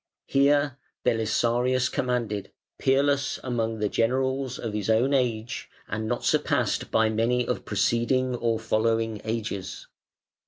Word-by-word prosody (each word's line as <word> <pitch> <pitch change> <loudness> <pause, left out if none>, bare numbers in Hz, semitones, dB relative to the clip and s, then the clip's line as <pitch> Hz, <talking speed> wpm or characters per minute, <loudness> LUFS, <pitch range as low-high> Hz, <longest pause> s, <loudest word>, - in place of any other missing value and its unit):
Here 140 0 +3 0.3
Belisarius 120 +3 +2
commanded, 120 -5 -2 0.3
peerless 140 0 +2
among 115 -3 -1
the 105 -1 0
generals 130 +3 0
of 110 -3 -4
his 105 0 -2
own 120 +5 +3
age, 120 -4 -1 0.2
and 110 +1 -3
not 120 +1 -2
surpassed - - +1
by 110 0 +3
many 115 +3 +1
of - - -2
preceding 120 +5 +1
or 115 -2 0
following 115 0 0
ages. 110 -4 -4
115 Hz, 120 wpm, -26 LUFS, 110-130 Hz, 0.3 s, Here